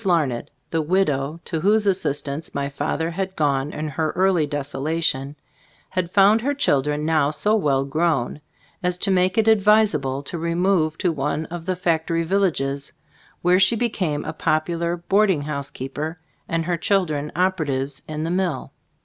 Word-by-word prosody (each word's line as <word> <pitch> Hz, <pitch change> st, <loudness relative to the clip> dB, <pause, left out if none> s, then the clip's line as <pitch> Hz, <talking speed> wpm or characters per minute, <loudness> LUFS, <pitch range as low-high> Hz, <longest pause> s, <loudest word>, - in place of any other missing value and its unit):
Larned, 155 Hz, -10 st, +1 dB, 0.2 s
the 165 Hz, -, +1 dB
widow 155 Hz, -3 st, 0 dB
to 165 Hz, -, -2 dB
whose 210 Hz, +3 st, +3 dB
as 195 Hz, -2 st, +3 dB
sistance 145 Hz, +1 st, -3 dB
my 140 Hz, 0 st, -1 dB
father 155 Hz, +3 st, -2 dB
had 190 Hz, +2 st, -3 dB
gone 145 Hz, -1 st, 0 dB
in 155 Hz, +1 st, -4 dB
her 155 Hz, +2 st, -1 dB
early 185 Hz, -5 st, +3 dB
desolation, 145 Hz, 0 st, -2 dB, 0.5 s
had 185 Hz, -2 st, -2 dB
found 205 Hz, +4 st, +5 dB
her 285 Hz, +4 st, 0 dB
chil 145 Hz, -, +3 dB
dren 150 Hz, +2 st, -2 dB
now 155 Hz, -3 st, +2 dB
so 155 Hz, +9 st, +1 dB
well 140 Hz, -9 st, +1 dB
grown 150 Hz, -2 st, 0 dB, 0.4 s
as 180 Hz, -1 st, 0 dB
to 195 Hz, +2 st, 0 dB
make 185 Hz, +1 st, +2 dB
it 220 Hz, 0 st, +3 dB
advisable 200 Hz, -11 st, +3 dB
to 170 Hz, +4 st, -5 dB
remove 170 Hz, -1 st, +1 dB
to 180 Hz, -, +1 dB
one 150 Hz, +1 st, -2 dB
of 175 Hz, 0 st, -6 dB
the 185 Hz, -, 0 dB
fac 165 Hz, -3 st, 0 dB
tory 165 Hz, 0 st, 0 dB
villages, 160 Hz, -7 st, 0 dB, 0.5 s
where 180 Hz, +1 st, +4 dB
she 195 Hz, +4 st, +4 dB
became 185 Hz, -10 st, -1 dB
a -, -, -4 dB
popular 170 Hz, +2 st, 0 dB
boarding 190 Hz, -2 st, +2 dB
house 140 Hz, -2 st, -4 dB
keeper, 150 Hz, +5 st, -5 dB, 0.3 s
and 165 Hz, 0 st, 0 dB
her 175 Hz, 0 st, 0 dB
children 155 Hz, -6 st, 0 dB
operatives 145 Hz, -7 st, 0 dB
in 155 Hz, 0 st, -4 dB
the 165 Hz, -, -2 dB
mill. 180 Hz, -6 st, -1 dB
165 Hz, 165 wpm, -22 LUFS, 145-185 Hz, 0.5 s, found